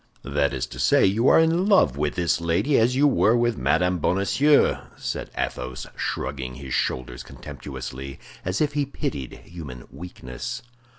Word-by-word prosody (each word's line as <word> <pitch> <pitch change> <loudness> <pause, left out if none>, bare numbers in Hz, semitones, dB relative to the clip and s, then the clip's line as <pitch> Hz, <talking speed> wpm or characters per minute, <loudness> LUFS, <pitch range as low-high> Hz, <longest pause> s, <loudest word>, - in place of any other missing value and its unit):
"That 70 +1 +1
is 65 -2 -2
to 60 - -9
say, 60 - +4
you 110 +6 +2
are - - +7
in 165 +4 +3
love 190 - +5
with 75 +1 -1
this 85 -1 +1
lady 90 - +2
as 120 +3 +3
you 140 +3 +4
were 120 -4 +4
with 120 -1 +2
Madame 90 0 +1
Bonacieux," 100 - +3 0.2
said - - -4
Athos, 65 0 -3
shrugging 65 -2 -3
his 65 -1 -7
shoulders 60 -1 -1
contemptuously, 65 0 -8 0.2
as 90 +3 -1
if 150 -1 +1
he 145 -1 0
pitied 70 - -5
human 70 -8 -9
weakness. 65 -8 -7
85 Hz, 160 wpm, -24 LUFS, -, 0.2 s, are